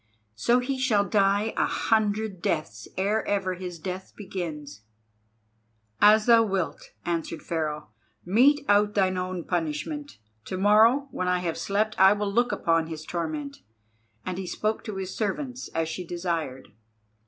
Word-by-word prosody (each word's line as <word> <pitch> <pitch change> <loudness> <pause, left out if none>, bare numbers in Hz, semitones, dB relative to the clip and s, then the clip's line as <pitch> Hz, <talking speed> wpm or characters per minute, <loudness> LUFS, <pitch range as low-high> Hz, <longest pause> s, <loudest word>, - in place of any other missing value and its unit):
So 235 - +2
he 260 +1 -2
shall 220 -6 +2
die 200 +1 +2
a - - +2
hundred 215 -3 0
deaths 110 -9 -2
ere 205 +3 +1
ever 195 -2 0
his 180 -1 -6
death 185 +3 -6
begins." 155 - -6 1.2
"As 215 +1 +6
thou 230 -1 +7
wilt," 195 -6 -2 0.2
answered 165 -1 -3
Pharaoh. 150 -4 -3 0.4
"Mete 275 +10 +4
out 205 +1 +3
thine 190 -2 +2
own 185 -1 -3
punishment. 175 - -3 0.3
To 185 - -4
morrow 220 +8 +5
when 185 - -2
I 180 0 +2
have 170 -2 -2
slept 215 +2 0
I 190 +1 +8
will 205 -1 -2
look 240 +2 +2
upon 165 -1 +1
his 160 -1 -7
torment." 155 -5 -4 0.7
And 185 0 -3
he 190 - -5
spoke 215 +4 -2
to 215 - -5
his 190 -1 -5
servants 250 +5 -3
as 165 0 -2
she 160 +3 -4
desired. 165 -6 -4
190 Hz, 150 wpm, -26 LUFS, 165-215 Hz, 1.2 s, I